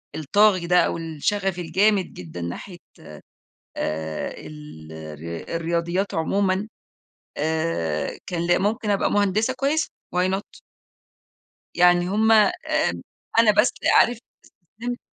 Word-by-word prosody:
الطاغي 185 Hz, +3 st, +3 dB
ده 180 Hz, 0 st, +5 dB
أو -, -, -2 dB
الشغف 175 Hz, +4 st, -2 dB
الجامد 190 Hz, +4 st, +1 dB
جدًا 85 Hz, 0 st, -8 dB
ناحية 130 Hz, -, -6 dB, 1.0 s
آآ 80 Hz, 0 st, -3 dB
ال 80 Hz, 0 st, -11 dB
الر 80 Hz, -, -7 dB
الرياضيات 170 Hz, +4 st, -1 dB
عمومًا 190 Hz, +4 st, 0 dB, 0.7 s
آآ، 155 Hz, -, -1 dB
كان 170 Hz, -1 st, -2 dB
ل 175 Hz, -, +3 dB
ممكن 215 Hz, +3 st, -1 dB
أبقى 200 Hz, -1 st, +1 dB
مهندسة 205 Hz, +5 st, +1 dB
كويّسة 290 Hz, +3 st, 0 dB, 0.3 s
why 180 Hz, +1 st, +2 dB
not؟ 195 Hz, +2 st, -5 dB, 1.2 s
يعني 175 Hz, 0 st, +4 dB
هُم 220 Hz, +3 st, +3 dB
آآ، 215 Hz, -2 st, +6 dB, 0.9 s
أنا 230 Hz, -2 st, +7 dB
بس 210 Hz, +3 st, +3 dB, 0.3 s
عارف 240 Hz, -1 st, +4 dB, 0.6 s
استسلمت 245 Hz, +1 st, -3 dB
180 Hz, 110 wpm, -23 LUFS, 150-205 Hz, 1.2 s, أنا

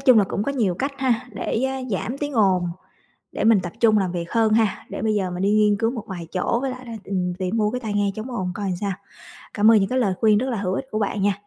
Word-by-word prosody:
chung 255 Hz, -4 st, +6 dB
là 205 Hz, -, +5 dB
cũng 200 Hz, -, -3 dB
có 280 Hz, -, -1 dB
nhiều 215 Hz, -10 st, +1 dB
cách 275 Hz, +9 st, -2 dB
ha, 250 Hz, -2 st, 0 dB
để, 225 Hz, +4 st, -2 dB
a, 265 Hz, 0 st, -2 dB
giảm 230 Hz, +6 st, -2 dB
tiếng 290 Hz, 0 st, -3 dB
ồn, 190 Hz, -6 st, +3 dB, 0.6 s
để -, -, -3 dB
mình 225 Hz, -3 st, +5 dB
tập 175 Hz, -, -5 dB
trung 220 Hz, -2 st, +5 dB
làm 185 Hz, -3 st, 0 dB
việc 170 Hz, -1 st, -4 dB
hơn 225 Hz, -2 st, +3 dB
ha. 220 Hz, -2 st, +1 dB
Để -, -, -5 dB
bây 220 Hz, 0 st, +1 dB
giờ 190 Hz, -3 st, -1 dB
mình 180 Hz, +1 st, -3 dB
đi 200 Hz, -, +3 dB
nghiên 210 Hz, -1 st, +4 dB
cứu 225 Hz, +2 st, +1 dB
một 235 Hz, -4 st, -5 dB
vài 175 Hz, -4 st, -6 dB
chỗ 190 Hz, +6 st, 0 dB
với 270 Hz, -1 st, -1 dB
lại 255 Hz, 0 st, -9 dB
là, 235 Hz, -, -8 dB
ừm, 180 Hz, -2 st, -2 dB
tìm 185 Hz, +4 st, -2 dB
mua 210 Hz, -1 st, +1 dB
cái 250 Hz, -, -2 dB
tai 220 Hz, -4 st, -4 dB
nghe 205 Hz, -1 st, +1 dB
chống 220 Hz, +4 st, -6 dB
ồn 185 Hz, -7 st, -2 dB
coi 205 Hz, -, -3 dB
làm 185 Hz, -2 st, -1 dB
sao. 200 Hz, -1 st, -1 dB, 0.6 s
Cảm 215 Hz, +2 st, +5 dB
ơn 225 Hz, -, +7 dB
những 195 Hz, -, +1 dB
cái 255 Hz, -, 0 dB
lời 200 Hz, -6 st, +1 dB
khuyên 215 Hz, -2 st, +5 dB
rất 260 Hz, +4 st, -1 dB
là 240 Hz, -, -1 dB
hữu 190 Hz, -2 st, -1 dB
ích 270 Hz, -, -3 dB
của 215 Hz, -, -1 dB
bạn 205 Hz, -1 st, -1 dB
nha. 205 Hz, 0 st, +3 dB
210 Hz, 300 wpm, -23 LUFS, 195-235 Hz, 0.6 s, ơn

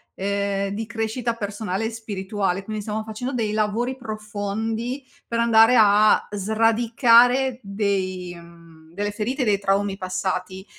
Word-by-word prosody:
ehm, 200 Hz, 0 st, -1 dB
di 215 Hz, +3 st, -4 dB
crescita 225 Hz, +2 st, -2 dB
personale 205 Hz, -1 st, -3 dB
e -, -, -1 dB
spirituale, 200 Hz, -3 st, -3 dB
quindi 215 Hz, +1 st, -5 dB
stiamo 215 Hz, +1 st, -3 dB
facendo 225 Hz, +5 st, -5 dB
dei 225 Hz, -4 st, -1 dB
lavori 215 Hz, +4 st, -1 dB
profondi 220 Hz, +2 st, -4 dB, 0.2 s
per 230 Hz, -, -2 dB
andare 230 Hz, +1 st, +5 dB
a 210 Hz, 0 st, +5 dB
sradicare 230 Hz, +4 st, +3 dB
dei, 195 Hz, -3 st, -2 dB
mhmm, 170 Hz, -1 st, -16 dB
delle 205 Hz, +2 st, -2 dB
ferite 245 Hz, +6 st, -2 dB
dei 205 Hz, -3 st, +2 dB
traumi 200 Hz, 0 st, 0 dB
passati, 185 Hz, 0 st, -3 dB
210 Hz, 130 wpm, -23 LUFS, 195-225 Hz, 0.2 s, andare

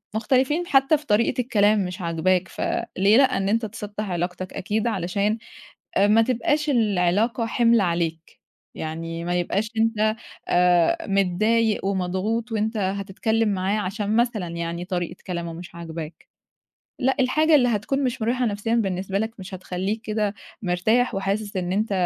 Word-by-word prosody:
مختلفين 270 Hz, +9 st, +1 dB
حتّى 275 Hz, +2 st, +4 dB
في 300 Hz, -, -15 dB
طريقة 230 Hz, +4 st, +2 dB
الكلام 210 Hz, -4 st, +2 dB
مش 180 Hz, +2 st, -6 dB
عاجباك، 175 Hz, +2 st, +1 dB
ف -, -, -8 dB, 0.4 s
ليه 200 Hz, +5 st, +5 dB
لأ، 265 Hz, -2 st, +4 dB
إن 195 Hz, 0 st, 0 dB
أنت 225 Hz, +1 st, +1 dB
تسطّح 210 Hz, -1 st, -6 dB
علاقتك 180 Hz, +1 st, -3 dB
أكيد 215 Hz, +4 st, -1 dB
علشان 200 Hz, +2 st, 0 dB, 0.6 s
آآ 200 Hz, +1 st, +5 dB
ما 220 Hz, +2 st, +5 dB
تبقاش 275 Hz, +6 st, 0 dB
العلاقة 215 Hz, 0 st, +2 dB
حِمل 230 Hz, -1 st, +3 dB
عليك، 170 Hz, -2 st, -2 dB, 0.4 s
يعني 165 Hz, +1 st, -5 dB
ما 175 Hz, 0 st, -1 dB
يبقاش 205 Hz, +5 st, -1 dB
أنت 220 Hz, -1 st, +2 dB, 0.3 s
آآ 175 Hz, 0 st, +3 dB
متضايق 210 Hz, +3 st, +2 dB
ومضغوط 195 Hz, +5 st, -1 dB
وأنت 220 Hz, +1 st, -1 dB
هتتكلّم 200 Hz, +3 st, 0 dB
معاه 195 Hz, +2 st, 0 dB
عشان 205 Hz, +2 st, -2 dB
مثلًا 230 Hz, -6 st, +1 dB
يعني 170 Hz, +1 st, -4 dB
طريقة 175 Hz, -2 st, -3 dB
كلامه 170 Hz, -2 st, -4 dB
مش 175 Hz, +1 st, -10 dB
عاجباك، 165 Hz, -1 st, -8 dB, 0.7 s
لأ 265 Hz, +1 st, +2 dB
الحاجة 305 Hz, +5 st, +4 dB
اللي 250 Hz, -3 st, +4 dB
هتكون 240 Hz, +5 st, 0 dB
مش 245 Hz, -3 st, -2 dB
مريحة 245 Hz, +3 st, +1 dB
نفسيًا 215 Hz, +2 st, -1 dB
بالنسبة 195 Hz, -3 st, -1 dB
لك 220 Hz, +1 st, -3 dB
مش 190 Hz, +1 st, -9 dB
هتخلّيك 190 Hz, +4 st, -3 dB
كده 215 Hz, -2 st, -1 dB, 0.3 s
مرتاح 220 Hz, +7 st, +1 dB
وحاسس 200 Hz, +1 st, -2 dB
إن 180 Hz, 0 st, -2 dB
أنت 215 Hz, +2 st, 0 dB
205 Hz, 150 wpm, -24 LUFS, 180-225 Hz, 0.7 s, ليه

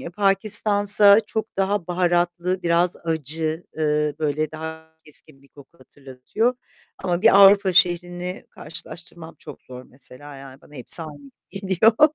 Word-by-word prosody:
ya 170 Hz, -, -8 dB
Pakistan'sa 205 Hz, +1 st, +3 dB
çok 220 Hz, 0 st, -6 dB
daha 195 Hz, -2 st, -1 dB
baharatlı, 175 Hz, 0 st, -1 dB
biraz 170 Hz, +1 st, 0 dB
acı, 160 Hz, +1 st, -4 dB
ııı, 150 Hz, -1 st, -1 dB
böyle 155 Hz, 0 st, -2 dB
daha 160 Hz, 0 st, -9 dB
keskin 150 Hz, -2 st, -3 dB
bir 140 Hz, -, -23 dB
koku 145 Hz, +4 st, -19 dB
hatırlatıyor 135 Hz, -, -4 dB, 0.4 s
ama 175 Hz, 0 st, -3 dB
bir 225 Hz, -2 st, +5 dB
Avrupa 200 Hz, -1 st, +6 dB
şehrini 175 Hz, +1 st, 0 dB
karşılaştırmam 165 Hz, +1 st, -10 dB
çok 150 Hz, -, -13 dB
zor 125 Hz, 0 st, -12 dB
mesela, 135 Hz, +2 st, -12 dB
yani 135 Hz, 0 st, -13 dB
bana 150 Hz, -, -20 dB
hepsi 135 Hz, +5 st, +4 dB
aynı 145 Hz, -3 st, -12 dB, 0.2 s
geliyor. 210 Hz, -, +2 dB
170 Hz, 135 wpm, -21 LUFS, 150-195 Hz, 0.4 s, Avrupa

